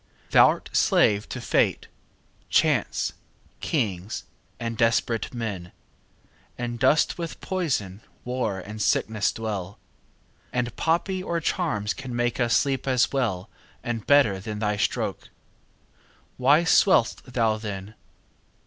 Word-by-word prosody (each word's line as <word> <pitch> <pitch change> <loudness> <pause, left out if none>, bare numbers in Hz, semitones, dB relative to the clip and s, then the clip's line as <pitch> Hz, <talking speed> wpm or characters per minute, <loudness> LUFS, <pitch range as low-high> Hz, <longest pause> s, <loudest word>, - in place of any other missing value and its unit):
Thou'rt - - +4
slave 105 0 +3
to - - -5
fate, - - +1 0.6
chance, - - +1 0.5
kings, 105 - -2 0.4
and 115 -1 -3
desperate 115 0 +1
men, 105 -8 -5 0.9
And 120 -1 -4
dost 140 +7 +3
with 170 -1 -5
poison, 125 - -2 0.2
war, 125 -6 -2
and 105 +3 -7
sickness 105 0 +1
dwell; 100 -4 -5 0.8
10 - - -4
And 120 -1 -2
poppy 180 +3 0
or 170 -2 -2
charms 150 - -1
can 130 -3 -7
make 120 0 -1
us 120 -2 +3
sleep 135 -1 -1
as 130 -2 +2
well 110 -9 -1 0.4
And 120 -3 -4
better 140 -10 +4
than 105 +2 -6
thy 105 -1 0
stroke. - - -2 1.1
Why 145 +6 +4
swell'st 175 - +4
thou 115 -3 +1
then? 105 -1 -6
115 Hz, 120 wpm, -25 LUFS, 105-135 Hz, 1.1 s, Thou'rt